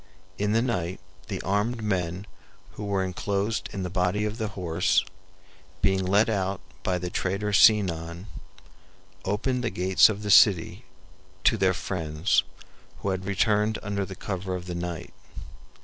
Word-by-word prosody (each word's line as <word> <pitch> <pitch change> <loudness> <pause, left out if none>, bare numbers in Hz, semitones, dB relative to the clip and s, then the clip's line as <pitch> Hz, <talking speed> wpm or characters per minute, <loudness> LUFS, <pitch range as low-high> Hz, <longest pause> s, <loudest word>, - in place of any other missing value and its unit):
In 105 +1 +1
the 115 +1 +3
night 95 -8 -2 0.3
the - - -4
armed 105 +5 0
men 90 -2 -2 0.5
who 105 - -8
were 100 -2 0
enclosed 100 +3 -2
in 95 - -4
the 90 - -3
body 95 +3 0
of 105 +2 -4
the 110 - -1
horse, 90 -4 0 0.8
being 95 -1 +2
let 100 +4 +3
out 100 -3 -1 0.2
by 90 -1 0
the 90 0 -4
traitor 100 +3 -1
Sinon, 90 -5 +3 1.0
opened 125 +6 -1
the 120 - 0
gates 95 +2 +4
of 105 -1 -4
the 105 - 0
city 95 -6 +5 0.6
to - - +4
their 95 -3 +2
friends, 80 -2 0 0.6
who 100 - -1
had 95 0 -2
returned 105 +2 +1
under 100 -1 -2
cover 95 -1 -4
of 90 -1 -6
the 90 - -5
night. 85 -1 -5
95 Hz, 150 wpm, -26 LUFS, 90-105 Hz, 1.0 s, city